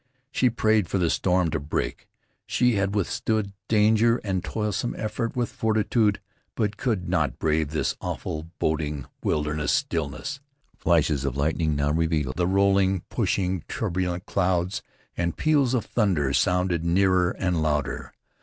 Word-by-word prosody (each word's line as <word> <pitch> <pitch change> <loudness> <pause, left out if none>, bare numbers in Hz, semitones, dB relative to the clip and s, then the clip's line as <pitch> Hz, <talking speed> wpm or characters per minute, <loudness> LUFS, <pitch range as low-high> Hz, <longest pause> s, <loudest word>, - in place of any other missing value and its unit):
She 125 - +3
prayed 110 -4 +2
for - - 0
the 85 -3 +2
storm 90 -3 +1
to 75 - -1
break. 70 +1 -3 0.4
She 125 -1 +2
had 100 -1 0
withstood 105 +1 -1
danger 110 +2 +4
and 95 -3 -1
toilsome 105 +1 -2
effort 115 +2 -3
with 120 -2 -1
fortitude; 110 -1 +1 0.4
but 105 -2 0
could 105 -5 -1
not - - 0
brave 80 -1 +1
this 75 0 -1
awful, 80 +1 -4
boding, 75 -3 -1 0.2
wilderness 75 0 0
stillness. 80 - -2 0.4
Flashes 80 -4 +2
of 70 -1 -2
lightning 80 +1 +1
now 70 +1 +1
revealed 80 -4 0
the 90 -1 +2
rolling, 95 -1 +3
pushing, 95 -2 0
turbulent 90 0 -2
clouds, 90 +1 0 0.3
and 85 -1 -2
peals 140 -5 +3
of 120 - -1
thunder 90 - +1
sounded 90 0 +1
nearer 90 +1 +3
and 90 -4 0
louder. 75 -2 -1
90 Hz, 140 wpm, -25 LUFS, 80-105 Hz, 0.4 s, danger